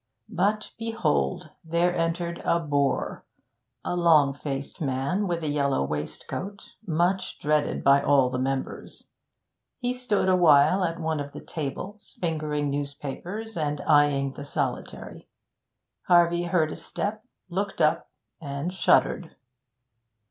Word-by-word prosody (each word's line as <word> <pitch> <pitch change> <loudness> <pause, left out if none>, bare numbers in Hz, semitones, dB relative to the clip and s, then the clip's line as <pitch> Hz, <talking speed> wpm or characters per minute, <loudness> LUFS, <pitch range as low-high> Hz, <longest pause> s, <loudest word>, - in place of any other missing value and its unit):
But 205 +4 0
behold, 75 - -1
there 170 +2 +1
entered 170 +1 -1
a 170 - +2
bore, 145 -4 0 0.6
a - - -1
long 155 -5 +5
faced 140 0 -5
man 140 +9 0
with 170 -2 -2
a - - -1
yellow 140 - +1
waistcoat, 75 - -5 0.2
much 175 +3 0
dreaded 150 0 0
by 140 0 +6
all 135 -3 +4
the 125 - -2
members; 135 +1 -4 0.7
he 245 -1 -1
stood 250 -6 0
a 185 - +5
while 170 +2 +5
at 170 -1 -1
one 160 -2 -1
of 145 0 -6
the - - -7
tables, 185 +8 -6
fingering 150 -4 -1
newspapers 145 +10 -5
and 150 -2 -1
eyeing 145 -2 +3
the 145 - -8
solitary. 140 -3 -4 0.8
Harvey 175 0 +4
heard 170 -3 +1
a - - -5
step, 215 +1 -4 0.2
looked 195 +2 -3
up, 155 -1 +2 0.3
and 145 +4 -4
shuddered. 180 -2 +2
160 Hz, 125 wpm, -26 LUFS, 140-180 Hz, 0.8 s, by